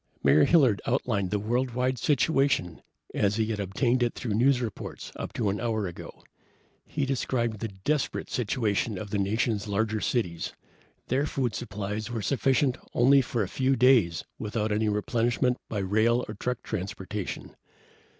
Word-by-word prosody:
Mayor 75 - +6
Hilliard 135 - +4
outlined 110 -6 0
the 105 - 0
worldwide 125 +4 0
situation 140 - +1 0.3
as 100 0 +1
he 110 0 +1
had 105 - -3
obtained 120 +6 +1
it 120 -1 +1
through 115 -4 -3
news 125 +4 +4
reports 115 -5 -6
up - - -5
to 110 -4 0
an 100 - -3
hour 110 -3 0
ago. 85 -2 -9 0.6
He 145 -2 -1
described 120 -4 -1
the 115 - -2
desperate 110 +9 -2
situation 110 -3 0
of 100 +1 -7
the 105 - 0
nation's 105 +1 0
larger 110 +1 0
cities. 90 -9 -1 0.6
Their 140 +4 +1
food 125 -6 -1
supplies 105 +2 -4
were 115 -3 -3
sufficient 135 0 +2
for - - -24
only 135 +3 +6
a 120 -5 -1
few 130 +6 +1
days 115 - +4 0.2
without 105 0 -2
any 105 +1 +1
replenishment 120 +4 +1
by 110 - -3
rail 110 +5 +2
and 110 -1 -8
truck 125 -1 -2
transportation. 100 0 -5
115 Hz, 155 wpm, -27 LUFS, 105-125 Hz, 0.6 s, Mayor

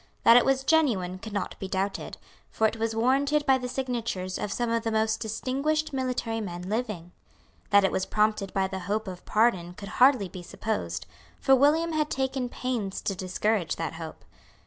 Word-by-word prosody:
That 230 - +8
it 245 - +6
was 270 0 +2
genuine 230 - +2
could 220 +2 -8
not 200 -2 -3
be 195 - -4
doubted; 195 +1 -3 0.3
for 220 - 0
it 220 +1 +1
was 225 0 -1
warranted 275 +5 +2
by 265 -1 +4
the 250 - -4
signatures 235 -8 -3
of 210 - -3
some 240 +1 -1
of 230 0 +1
the 225 - -2
most 220 0 +1
distinguished 275 +8 -1
military 250 -4 -1
men 175 -3 -5
living. 205 -4 -3 0.6
That 200 -1 +6
it 195 - +2
was 190 - -1
prompted 210 -2 +1
by 195 -1 +1
the 190 0 -5
hope 215 +1 -1
of 180 -1 -7
pardon 190 -6 +1
could 200 0 -8
hardly 255 -6 +6
be 180 0 -9
supposed; 100 - -3 0.3
for 270 - +5
William 305 +5 +3
had 305 -1 0
taken 265 -1 -1
pains 235 -7 -3
to 195 - -1
discourage 185 -1 -1
that 165 - -3
hope. 165 -1 -9
220 Hz, 190 wpm, -27 LUFS, 190-255 Hz, 0.6 s, That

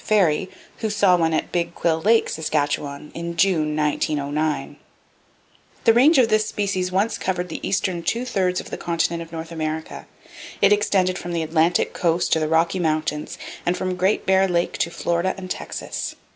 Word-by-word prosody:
Ferry, 185 -4 +2 0.3
who 220 - -2
saw 205 -3 +4
one 165 -2 +1
at 155 - -1
Big 170 -1 -1
Quill 160 -1 0
Lake, 225 +4 +4
Saskatchewan, 145 -2 -2
in 170 0 -5
June, 160 -5 +2
1909. 150 0 -1 1.1
The 225 - +6
range 275 +7 +5
of 250 -3 +5
this 215 -1 +2
species 190 -4 -1
once 200 +5 0
covered 180 -1 -2
the - - -5
eastern 185 -3 -1
two 235 +8 -1
thirds 185 -6 0
of - - -9
the - - -5
continent 170 0 -1
of 165 -1 -9
North 165 0 -6
America. 160 -1 -4 0.5
It 200 +1 +5
extended 190 -3 +1
from 175 0 -5
the 165 -1 0
Atlantic 160 +2 +1
coast 170 0 +1
to 160 - +3
the 155 - 0
Rocky 165 +4 +2
Mountains, 155 -2 -1 0.3
and 175 +1 0
from 185 -1 -2
Great 190 +3 +1
Bear 190 0 +4
Lake 175 -1 0
to - - +1
Florida 170 +2 -1
and 185 -1 -7
Texas. - - -5
175 Hz, 175 wpm, -22 LUFS, 160-190 Hz, 1.1 s, The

